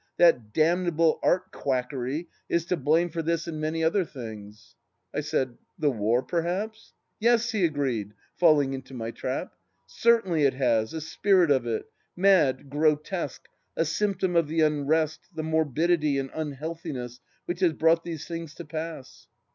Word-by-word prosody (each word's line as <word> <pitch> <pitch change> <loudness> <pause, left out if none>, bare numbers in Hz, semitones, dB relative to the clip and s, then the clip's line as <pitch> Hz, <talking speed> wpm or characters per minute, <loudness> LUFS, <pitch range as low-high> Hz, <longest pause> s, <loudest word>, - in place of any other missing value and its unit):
That 125 -11 +4
damnable 165 +2 +2
art 185 +1 +1
quackery 130 +3 -2 0.2
is 170 -1 +1
to 180 - 0
blame 160 +3 +2
for 165 +1 -2
this 165 +1 -1
and 155 -2 -4
many 160 +1 -1
other 175 +4 +3
things. 110 -8 -10 0.2
..." - - -50
I - - -1
said, 130 -2 -2
" - - -49
The 150 -4 +2
war, 115 +2 +1
perhaps? 190 +6 -3
" - - -51
" - - -50
Yes," 235 +1 +3
he 210 -4 0
agreed, 130 -10 -2 0.2
falling 150 -5 +4
into 135 0 -7
my 115 -1 -4
trap. 130 +3 -4 0.2
" 80 - -46
Certainly 180 - +2
it 135 - +2
has, 115 -4 +2
the 160 - -5
spirit 175 +1 +3
of 130 -4 +2
it. 115 -1 -2 0.3
Mad, 175 -8 +3
grotesque, 150 +5 -1 0.3
a 165 - +2
symptom 190 +1 0
of 165 -3 +3
the 160 +1 0
unrest, 155 +1 +1 0.2
the 155 - -3
morbidity 160 -1 +1
and 135 -1 -3
imhealthiness 150 -4 -5 0.3
which 175 0 -3
has 175 -3 +3
brought 165 +2 +3
these 165 -3 -6
things 165 -2 -6
to 170 - -8
pass. 155 - -7
155 Hz, 170 wpm, -27 LUFS, 135-170 Hz, 0.3 s, That